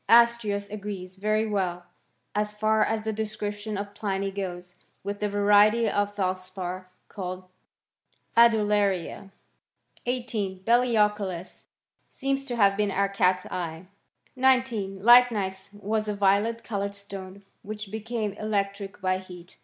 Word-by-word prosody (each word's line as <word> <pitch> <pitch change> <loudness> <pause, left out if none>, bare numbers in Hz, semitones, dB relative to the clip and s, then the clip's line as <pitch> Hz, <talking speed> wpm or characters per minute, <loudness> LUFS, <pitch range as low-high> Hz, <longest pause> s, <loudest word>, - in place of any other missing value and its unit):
Astrios 230 -4 +4
agrees 195 -3 -6
very 215 +2 +1
well, 185 -4 -2 0.5
as 210 0 -1
far 215 +1 +2
as 220 -1 -1
the 220 0 -2
description 210 0 -4
• - - -3
of 200 0 -6
Pliny 195 -1 -2
goes, 180 -2 -5 0.3
with 200 +1 -4
the 210 - 0
variety 205 +3 +4
of 205 0 0
telspar 185 -1 -3 0.2
called 185 -2 -6 0.9
mith 235 0 +8
laria. 205 -3 0 0.7
c* - - -22
18. 220 -7 -2
Belioculus 210 -6 +1 0.4
seems 275 0 -2
to 250 -3 -3
have 200 -3 +4
been 210 0 +1
our 200 +1 +1
catseye.. 180 -3 -1 0.5
19. 250 -7 +1
Lychnites 210 -6 +5
was 215 +1 -2
a 210 - -1
violet 205 +4 +2
coloured 200 -2 -3
stone, 200 -1 -9 0.2
wkirfl 210 -1 -7
became 220 -1 -3
electric 200 -1 -3
by 185 0 +1
heat. 180 -2 -13
205 Hz, 130 wpm, -26 LUFS, 190-215 Hz, 0.9 s, mith